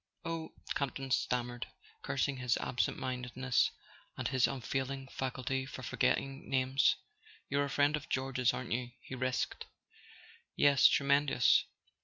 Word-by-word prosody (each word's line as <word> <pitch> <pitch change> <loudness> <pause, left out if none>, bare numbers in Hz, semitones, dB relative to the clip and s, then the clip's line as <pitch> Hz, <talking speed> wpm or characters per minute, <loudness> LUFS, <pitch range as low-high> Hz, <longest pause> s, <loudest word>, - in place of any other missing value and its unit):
"Oh 165 -1 -4
" - - -4
Campton 135 -1 -3
stammered, 120 0 0 0.3
cursing 140 - -1
his 125 -3 +1
absent 125 - -1
mindedness 125 0 0 0.5
and - - -1
his 130 -2 +3
unfailing 135 +1 -3
faculty 130 0 -2
for 130 0 -8
forgetting 135 +1 0
names. 130 0 +3 0.5
"You're 140 +1 +2
a - - -5
friend 145 +2 +3
of 150 - -7
George's, 130 -1 +1
aren't 130 - -5
you?" 120 +1 -1
he - - -10
risked. 130 0 -2 0.9
"Yes—tremendous. 140 -1 +5
130 Hz, 125 wpm, -33 LUFS, 125-140 Hz, 0.9 s, Yes—tremendous